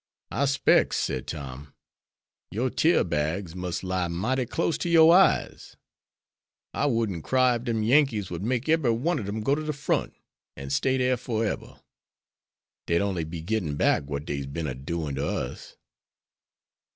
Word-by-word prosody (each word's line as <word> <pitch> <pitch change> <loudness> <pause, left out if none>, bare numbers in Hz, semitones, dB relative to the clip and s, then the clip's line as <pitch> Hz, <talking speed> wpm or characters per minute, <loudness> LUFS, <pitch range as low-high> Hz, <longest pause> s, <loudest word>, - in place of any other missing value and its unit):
"I 140 - +1
specs," 140 +1 +3
said 65 - -2
Tom, 70 -2 -7 0.7
"your 120 +6 -1
tear 165 +2 +3
bags 80 +3 -2
must 90 -1 -4
lie 95 -1 -1
mighty 115 +10 -1
close 165 +5 0
to 175 - -2
your 165 0 +7
eyes. 190 +1 +2 1.0
I 145 - 0
wouldn't 110 - -1
cry 130 -1 +3
ef 120 +1 -4
dem 115 -3 0
Yankees 115 -6 +2
would 85 - -4
make 120 +5 -1
ebery 155 -7 +3
one 150 +7 0
ob 100 - -5
dem 105 +2 -3
go 135 - +2
to 150 - 0
de 155 0 -2
front, 145 0 -1 0.4
an' 70 0 -7
stay 130 - +1
dere 125 0 +2
foreber. 115 -2 -3 1.1
Dey'd 85 0 +2
only 95 -5 -1
be 80 0 -7
gittin' 90 -6 -1
back 70 - +2
what 70 +1 -5
dey's 70 -4 -4
been 80 +4 -4
a 65 - -2
doin' 75 +3 -4
to 70 +2 -2
us." - - -5
105 Hz, 165 wpm, -26 LUFS, 80-130 Hz, 1.1 s, your